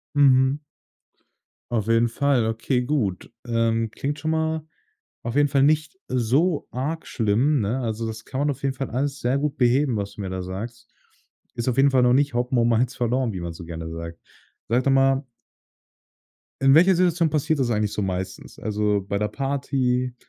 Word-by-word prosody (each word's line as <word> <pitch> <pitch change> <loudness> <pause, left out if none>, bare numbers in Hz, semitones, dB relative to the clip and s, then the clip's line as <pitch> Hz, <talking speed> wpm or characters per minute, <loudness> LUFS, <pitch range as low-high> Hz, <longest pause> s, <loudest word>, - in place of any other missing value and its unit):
Mhm. 135 +1 +4 1.1
Auf 110 -3 -1
jeden 115 +1 +3
Fall, 130 -2 +1
okay, 120 +3 0
gut. 120 -8 -2
Ähm, 115 -1 +1
klingt 145 +5 -4
schon 160 +1 -1
mal 160 -1 -1 0.6
auf 120 +3 -3
jeden 145 0 +4
Fall 135 -1 +2
nicht 155 +5 +1
so 135 +7 +1
arg 150 +6 -3
schlimm, 120 +6 +1
ne? 110 +6 -1
Also 115 -2 -3
das 110 0 -7
kann 135 +1 -4
man 145 - +2
auf 135 -1 -6
jeden 135 -1 0
Fall 135 0 -4
alles 140 +3 -2
sehr 125 +3 +1
gut 150 0 -2
beheben, 125 0 +2
was 100 0 -4
du - - -10
mir 95 -2 -4
da 95 0 -4
sagst. 115 +6 -7 0.6
Ist 120 +1 -2
auf 125 - 0
jeden 135 0 +4
Fall 130 -1 +4
noch 125 0 +4
nicht 140 -1 +2
Hopfen 125 +1 0
und 115 0 +3
Malz 120 +2 +1
verloren, 120 -1 0
wie 95 - -5
man 85 -1 -5
so 85 +1 -10
gerne 80 -1 -6
sagt. 85 0 -7 0.5
Sag 120 +3 +2
doch 135 - +3
mal 135 +1 +3 1.4
in 135 +1 +6
welcher 180 +4 +6
Situation 170 -2 +2
passiert 155 0 0
das 120 -3 +1
eigentlich 105 -1 0
so 105 - -2
meistens? 95 0 -4
Also, 105 -1 0
bei 100 0 -2
'ner 105 - 0
Party 130 -1 -1
125 Hz, 190 wpm, -24 LUFS, 110-140 Hz, 1.4 s, in